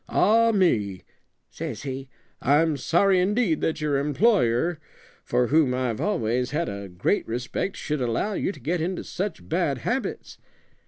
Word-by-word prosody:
'Ah, 230 +3 +4
me!' 110 - +1 0.5
says - - -6
he, 135 -1 -5 0.3
'I'm 150 +3 +3
sorry 180 +7 +3
indeed 195 -3 +1
that 160 - -1
your 150 -2 +1
employer, 150 - +2 0.4
for 125 0 +1
whom 145 -4 +3
I've 125 -4 -2
always 125 - 0
had 160 +5 -1
a 100 -1 -6
great 90 - 0
respect, 125 +11 -3
should 150 -2 -3
allow 125 - 0
you 195 - -1
to 155 - -12
get 160 +7 -1
into 180 +3 -2
such 185 - -5
bad - - 0
habits.' - - -3
150 Hz, 150 wpm, -25 LUFS, 125-185 Hz, 0.5 s, Ah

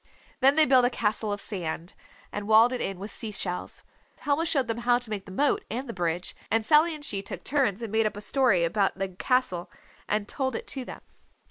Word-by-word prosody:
Then 270 +1 +5
they 315 -1 +6
built 255 -2 +5
a 245 - +4
castle 215 -2 -1
of 205 - -2
sand, 175 -4 -4 0.4
and 205 0 -5
walled 225 +3 +6
it 250 - -3
in 195 - -3
with 200 +3 -7
sea 225 - -5
shells. 180 -3 -5 0.4
Helma 295 +3 +1
showed 270 -6 +2
them 230 0 -2
how 240 0 +3
to 245 -2 -8
make 200 -2 -4
the 190 - -11
moat 290 - +1
and 255 +5 -4
the 230 - -5
bridge, 175 0 -2
and 225 -1 +1
Sally 310 +5 +4
and 295 -1 -9
she 200 -5 -2
took 195 - -7
turns 250 -7 0
and 225 - -5
made 220 0 +2
up 210 - -5
a - - -6
story 235 -6 +3
about 195 +4 +1
the 195 -1 -2
castle 185 -2 -1 0.4
and 210 0 0
told 260 -4 -2
it - - -4
to 265 -2 -2
them. - - -9
225 Hz, 230 wpm, -27 LUFS, 195-260 Hz, 0.4 s, they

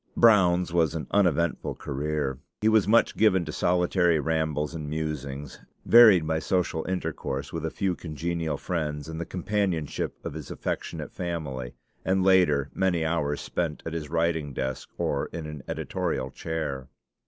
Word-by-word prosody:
Brown's 90 -6 +5
was 85 -2 +2
an 80 - -3
uneventful 85 -4 +1
career. 70 -1 -2 0.2
He 110 - +2
was 110 -3 +4
much 115 +2 +4
given 95 -5 +3
to 75 - -5
solitary 90 -1 +2
rambles 80 -1 -1
and 75 -3 -5
musings, 75 -3 -4 0.3
varied 110 -8 +8
by 80 0 0
social 85 -3 0
intercourse 75 -6 -3
with 80 -1 -2
a - - -2
few 95 +1 -1
congenial 80 -1 -3
friends 75 -4 -3
and 80 0 -5
the - - -5
companionship 90 -4 -2
of - - -4
his 75 -3 -7
affectionate - - -4
family, 75 -8 -4 0.3
and 95 0 +2
later, 90 -8 +4
many 90 -4 +1
hours 75 -3 0
spent 80 -4 -3
at 80 - -4
his 80 -3 -4
writing 80 -3 0
desk 65 0 -3
or - - -1
in 80 -1 -6
an 75 -2 -7
editorial 65 0 -2
chair. 70 -5 -4
80 Hz, 155 wpm, -27 LUFS, 75-90 Hz, 0.3 s, varied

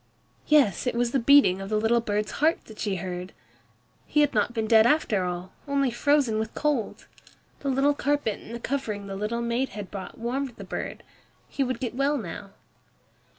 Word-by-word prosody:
Yes, 280 -7 +3
it 250 - 0
was 240 0 +1
the 270 - +2
beating 235 -7 +5
of 195 - -6
the 215 - +1
little 225 +2 +2
bird's 210 -1 -1
heart 320 +2 +2
that 220 - -13
she 205 -3 -1
heard. 180 +1 -5 0.7
He 300 - +3
had 290 -1 +2
not 210 +2 +2
been 225 -2 -2
dead 220 0 +6
after 225 -9 +2
all, 180 +1 -4 0.2
only 275 -2 +1
frozen 255 -2 +2
with 220 0 -4
cold. 290 -7 -1 0.5
The 280 - -3
little 270 +2 +3
carpet 285 -6 -1
and 235 - -9
the - - -6
covering 230 -6 -3
the 195 -1 -6
little 215 +4 -2
maid 235 +3 0
had 205 -1 -8
brought 195 -2 -7
warmed 245 +2 -3
the - - -9
bird. - - -5 0.4
He 275 - -1
would 255 -2 -2
get 245 -4 -3
well 275 +3 +1
now. 200 -2 -7
235 Hz, 195 wpm, -26 LUFS, 210-275 Hz, 0.7 s, dead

